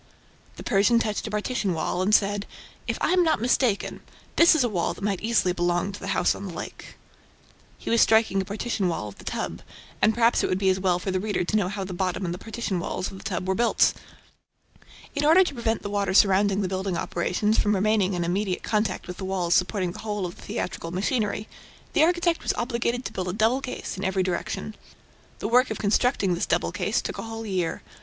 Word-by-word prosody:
The - - -9
Persian 210 +3 +3
touched 215 -1 -1
a - - -4
partition 210 -3 -1
wall 160 +3 -1
and 190 - +1
said: 205 0 +1 0.4
"If - - -1
I - - +2
am 365 0 +4
not 320 -8 +2
mistaken, 240 -2 +1 0.4
this 335 -1 +7
is 300 - +3
a - - +2
wall 180 -5 -1
that - - -10
might 200 -2 -1
easily 220 -5 +2
belong 175 +2 0
to 200 - -9
the 195 - -7
house - - +3
on 200 - -7
the 180 - -7
lake." - - -8 0.8
He - - -5
was 230 - +4
striking 220 -3 +4
a - - -5
partition 205 -1 -2
wall 135 -12 -2
of 100 - -15
the - - -11
"tub," - - -4 0.4
and 220 - +4
perhaps 235 0 +3
it - - 0
would 185 - +1
be 190 0 +2
as 185 - -1
well 185 -2 +2
for 190 +2 -3
the 185 - 0
reader 205 -1 -1
to 195 - -2
know 200 -4 +2
how 200 0 -4
the 190 -1 -6
bottom 185 +1 -2
and 170 - -2
the 180 - -7
partition 225 -4 -3
walls 180 - -3
of 190 - -9
the - - -13
tub 185 -2 -3
were 190 - +2
built. 235 +4 +3 1.2
In 285 - -1
order 325 +5 +7
to 345 - -4
prevent 230 -3 -1
the - - -3
water 200 -2 0
surrounding 200 0 +4
the - - 0
building 190 -1 -2
operations 185 +6 0
from 210 0 +2
remaining 200 -1 +2
in 175 - -1
immediate 185 +2 -1
contact 210 -3 -1
with 180 0 -7
the 190 - -5
walls 180 -2 0
supporting 185 -1 +1
the - - -10
whole 210 -3 -3
of 175 - -6
the - - -15
theatrical 165 - -4
machinery, 210 +3 -1 0.5
the - - +3
architect 345 0 +2
was - - -1
obliged 240 0 -1
to - - -5
build 185 -1 -3
a 180 - -2
double 225 +6 +2
case 255 - -5
in 190 - -5
every 190 0 +1
direction. 185 +4 -3 0.6
The - - -3
work 250 +3 +4
of - - -3
constructing 205 -2 +2
this 175 - -1
double - - +1
case - - -1
took - - -5
a - - -2
whole 225 0 -6
year. 185 -5 -2
200 Hz, 230 wpm, -25 LUFS, 185-225 Hz, 1.2 s, this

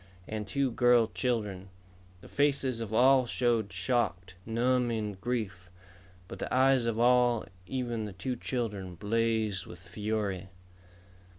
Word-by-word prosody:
And 105 -1 -4
two 135 +4 0
girl 120 0 +4
children. 105 -6 -2 0.5
The - - -13
faces 140 -4 +1
of 110 -2 -5
all 130 +2 +5
showed 115 -5 +1
shocked, 90 -2 -1
numbing 115 -3 0
grief. 105 -8 -3 0.6
But - - -9
the - - -4
eyes 130 -2 +4
of 115 -1 -1
all, 120 -1 +4 0.2
even 120 -4 -2
the 105 - -7
two 125 +7 -3
children, 105 -8 -4
blazed 110 -1 0
with 85 - -10
fury. 100 +1 -3
115 Hz, 125 wpm, -30 LUFS, 100-125 Hz, 0.6 s, all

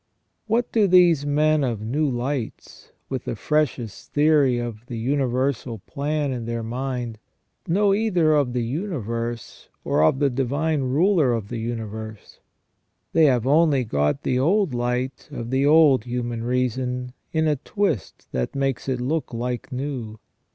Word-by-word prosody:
What 230 +2 +1
do 215 -3 +3
these 175 -5 +5
men 150 +1 +3
of 120 -5 -1
new 145 +7 0
lights, 125 -1 -4 0.2
with - - -4
the - - -3
freshest 135 -8 -2
theory 145 -4 +4
of 120 -2 -5
the 120 - -5
universal 130 -1 -1
plan 145 +6 -2
in 120 -3 -4
their 115 0 -3
mind, 120 -1 -4 0.5
know 195 +3 +3
either 185 -7 +2
of 140 -5 +2
the 125 -1 0
universe, 120 - -4
or - - +1
of 80 +11 +4
the 140 -1 +2
Divine 140 +4 0
Ruler 145 +1 +3
of 110 -3 -3
the 120 - -4
universe? 110 -2 -6 0.7
They 160 -1 +5
have 125 -5 +3
only 145 -1 +4
got 75 - 0
the 125 - +1
old 180 +2 +2
light 125 +2 -2
of 115 +1 -6
the 135 +2 +2
old 150 -6 +5
human 120 -1 -3
reason 125 0 -1 0.2
in 160 -1 +1
a 150 -2 +2
twist 195 - -2
that 65 - -2
makes 135 -1 -1
it 130 -2 -1
look 145 +6 -2
like 125 +2 -3
new. 125 -5 -4
130 Hz, 150 wpm, -23 LUFS, 120-150 Hz, 0.7 s, these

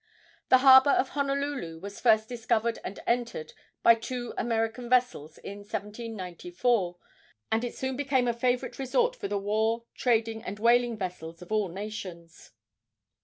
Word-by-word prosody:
The 255 - +8
harbor 265 +1 +9
of 270 -1 +3
Honolulu 280 - -2
was 200 +3 -8
first 220 -2 +4
discovered 230 -1 -1
and 195 - -6
entered 235 -9 -2 0.3
by 230 - +8
two 240 +1 -5
American 225 0 -1
vessels 245 - +1
in 200 +1 -8
1794, 205 -2 -3 0.5
and 225 +1 +1
it 245 - -4
soon 265 0 -3
became 265 -2 +1
a 240 - +2
favorite 245 +3 -1
resort 475 - +1
for - - -5
the 205 +1 -1
war, 220 +3 0
trading 225 -2 0
and 205 - -6
whaling 235 +1 +3
vessels 180 -3 -6
of 180 - -16
all 215 -2 +1
nations. 185 -3 -8
225 Hz, 145 wpm, -28 LUFS, 200-245 Hz, 0.5 s, harbor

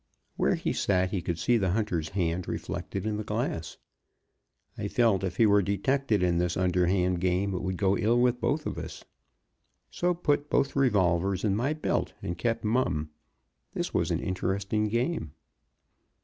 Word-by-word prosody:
Where - - +2
he - - -2
sat 90 -2 +1
he 95 - -1
could 85 -1 -2
see 120 +7 +2
the 95 -3 +1
hunter's 90 -8 -1
hand 90 -2 -1
reflected 95 0 -4
in 110 -1 -1
the 110 - -3
glass. - - -3 1.0
I - - -3
felt 110 -6 +2
if 90 -1 -3
he 115 - +5
were 105 -1 +5
detected 105 +2 +1
in 85 -1 +2
this 90 -1 0
underhand 90 0 +1
game 95 +2 +1
it 90 - -2
would 95 -1 -2
go 100 0 +2
ill 115 +5 +2
with 125 0 +2
both 150 +1 0
of - - -3
us; - - -8 0.9
so 175 0 0
put 150 -3 0
both 140 0 +1
revolvers 95 -8 +2
in 100 -2 +2
my 130 +8 0
belt, 155 - -1
and 85 - -3
kept 115 +6 -1
mum. 105 -10 0 0.6
That - - -3
was - - +1
an - - 0
interesting 100 +3 -1
game. 115 - -1
100 Hz, 170 wpm, -28 LUFS, 90-115 Hz, 1.0 s, he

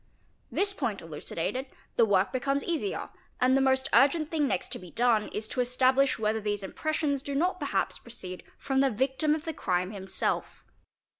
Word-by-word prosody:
This 400 0 +2
point 235 - -2
elucidated, 165 - -3 0.3
the 230 - +5
work 200 0 +2
becomes 275 +2 0
easier, 345 +4 -2 0.3
and 255 +1 +4
the 270 - +4
most 265 0 +3
urgent 290 +5 +4
thing 305 -3 +1
next 180 - -1
to - - -2
be 180 - -11
done 230 0 +2
is 215 +1 -4
to 255 - 0
establish 260 +2 +3
whether 220 0 0
these 205 -1 -2
inypressions 295 +5 -1
do 280 0 -4
not 355 +6 +1
perhaps - - -1
proceed 185 -6 -6 0.2
from 270 -1 0
the 270 0 +4
victim 265 +6 +1
of 315 +1 -6
the 325 - -3
crime 180 -6 -1
himself. 190 -2 -3
260 Hz, 175 wpm, -29 LUFS, 210-280 Hz, 0.3 s, the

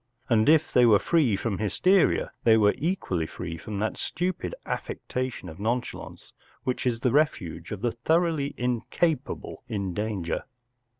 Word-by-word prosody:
And 110 +1 +4
if 160 0 +4
they 125 -1 +6
were 105 -3 +7
free 145 -5 +2
from 100 0 -2
hysteria 180 - +3
they 110 -1 +6
were 105 -1 +4
equally 135 - -1
free 85 -1 -6
from 105 +3 -6
that 110 +2 -1
stupid 180 - -2
affectation 125 -6 -4
of 80 +1 -9
nonchalance 120 +4 -4 0.3
which 130 0 -1
is 115 -2 0
the 125 - +2
refuge 105 - 0
of 105 -2 -5
the 120 0 +1
thoroughly 160 +3 +1
incapable 125 +5 -1
in 100 -5 -2
danger. 105 -4 -2
120 Hz, 145 wpm, -27 LUFS, 105-150 Hz, 0.3 s, were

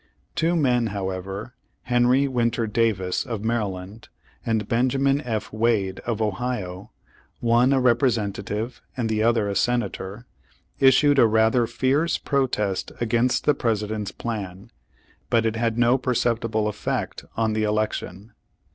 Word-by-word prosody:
Two 170 +2 +1
men, 125 -7 +2
however, 95 +2 -5 0.3
Henry 125 +3 +3
Winter 120 -3 0
Davis, 105 -5 0
of 115 -4 -5
Maryland, 105 -2 -3 0.3
and 110 -3 -1
Benjamin 135 +4 +2
F. 110 -4 -3
Wade, 110 -4 +1
of 115 -2 0
Ohio, 105 -4 -3 0.5
one 120 +2 +3
a 135 - +3
Representative, 115 -3 0 0.2
and 115 -3 -1
the 110 -1 0
other 115 -2 +2
a 100 - -2
Senator, 115 -2 -1 0.5
issued 135 +2 +5
a 115 - +7
rather 110 +2 +3
fierce 145 +8 +1
protest 125 -9 -1
against 120 +2 +1
the 150 - +5
President's 105 -4 -2
plan, 100 -2 -6 0.6
but 115 -2 +2
it 110 0 0
had 115 0 -1
no 120 +2 +4
per 125 -1 -1
ceptible 115 -2 0
effect 105 - -3
on 110 -1 +1
the 110 - 0
election. 105 -1 -2
115 Hz, 130 wpm, -24 LUFS, 105-125 Hz, 0.6 s, a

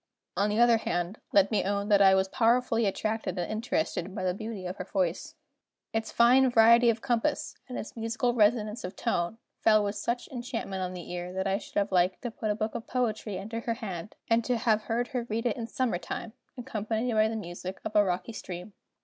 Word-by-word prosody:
On 205 +1 +2
the 210 +2 0
other 235 -1 +6
hand, 175 -2 -2
let 200 -1 +4
me 215 - +2
own 200 +1 -1
that 200 -1 +5
I 190 -1 +7
was 190 0 +2
powerfully 230 +1 +2
attracted 215 -1 -2
and 175 +2 -2
interested 215 - -2
by 190 - -3
the 180 -1 +1
beauty 215 -1 -6
of 180 +2 -5
her 185 - -4
voice. 180 -2 -2 0.6
Its 225 0 -2
fine 255 +3 +5
variety 235 +1 +6
of 225 -1 0
compass, 240 -4 0 0.2
and 250 - -5
its - - -7
musical 230 +2 0
resonance 215 -1 +2
of 180 - -6
tone, 175 +5 -1 0.2
fell 215 -1 +5
with 200 0 -1
such 235 +4 -2
enchantment 235 -6 -4
on 185 0 -3
the 175 -1 -8
ear, 175 0 -4
that 190 +1 -2
I 195 +1 +1
should - - -14
have 200 0 +1
liked 180 0 +2
to 240 - -3
put 220 -1 -4
a 210 - +1
book 215 +1 -2
of 230 - -6
poetry 220 -5 -1
into 220 +4 -5
her 230 0 -2
hand, 200 -5 -6
and 230 0 +3
to 245 0 0
have 220 -1 +1
heard 240 +1 -1
her 245 -2 -3
read 225 +2 -2
it 235 - +1
in 230 -2 -5
summer 235 -7 -1
time, 210 +5 -6 0.2
accompanied 230 -1 -2
by 215 0 +4
the 225 - -3
music 185 -1 -6
of 220 - -4
a 210 - +7
rocky 185 +3 -2
stream. 180 -1 -7
215 Hz, 220 wpm, -29 LUFS, 190-230 Hz, 0.6 s, I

